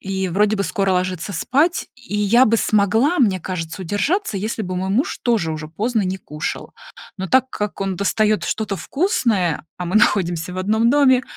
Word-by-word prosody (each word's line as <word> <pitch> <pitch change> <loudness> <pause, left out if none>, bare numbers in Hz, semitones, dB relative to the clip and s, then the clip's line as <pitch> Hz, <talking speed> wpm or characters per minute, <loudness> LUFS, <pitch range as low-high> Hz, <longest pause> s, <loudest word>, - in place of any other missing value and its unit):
и 190 -1 -2
вроде 210 +4 +2
бы 200 - 0
скоро 195 -2 0
ложиться 185 +1 -2
спать, 305 - +1
и 245 -5 -6
я 225 +5 +5
бы 230 -1 +3
смогла, 220 - +2
мне 195 -8 +2
кажется, 175 0 -5
удержаться, 215 - -1
если 215 +3 -3
бы 185 -1 -4
мой 190 +1 -2
муж 245 +8 0
тоже 225 -9 +1
уже 155 0 -6
поздно 220 +6 -1
не 190 +1 -2
кушал. 150 -3 -6 0.4
Но 190 -1 -4
так 260 0 +3
как 210 -3 -4
он 195 -2 -2
достает 215 +2 +1
что-то 210 -2 -2
вкусное, 220 - 0
а 180 - -4
мы 185 - 0
находимся 175 -4 +1
в 185 - -5
1 220 +5 +2
доме, 265 -3 +4
205 Hz, 185 wpm, -20 LUFS, 185-235 Hz, 0.4 s, я